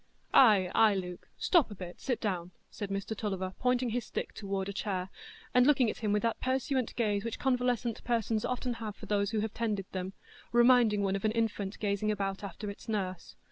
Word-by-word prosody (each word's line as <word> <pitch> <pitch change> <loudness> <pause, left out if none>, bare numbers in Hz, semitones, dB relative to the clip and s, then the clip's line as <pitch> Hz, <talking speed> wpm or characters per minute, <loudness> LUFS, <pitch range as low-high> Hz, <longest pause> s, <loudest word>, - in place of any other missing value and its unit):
"Ay, 205 -8 +6
ay, 215 -2 +5
Luke; 180 -2 -5
stop 340 -10 +3
a 205 - -8
bit, 180 -1 -9
sit 250 -3 -1
down," 180 -4 -2 0.2
said 205 -2 -5
Mr 200 +2 -3
Tulliver 190 -3 -3
pointing 250 -1 +1
his 245 +1 -1
stick - - -4
toward 195 -2 -3
a 200 - -4
chair, 190 -2 -2 0.4
and 250 +1 +5
looking 260 -6 +4
at - - -10
him 215 -3 0
with 210 0 +1
that 230 -1 0
pursuant 260 -1 0
gaze 205 -4 +1
which 230 -1 -3
convalescent 250 -3 0
persons 225 -2 0
often 250 0 -1
have 215 -2 -4
for - - -10
those 200 -1 +1
who 220 -1 0
have 220 0 -3
tended 210 -4 -1
them, 185 0 -4 0.4
reminding 240 -4 +5
one 195 0 +1
of 195 - -4
an 215 - +2
infant 215 -3 -1
gazing 205 0 0
about 195 -1 -2
after 200 +2 -6
its 200 - -12
nurse. 185 -5 -3
210 Hz, 205 wpm, -31 LUFS, 195-235 Hz, 0.4 s, Ay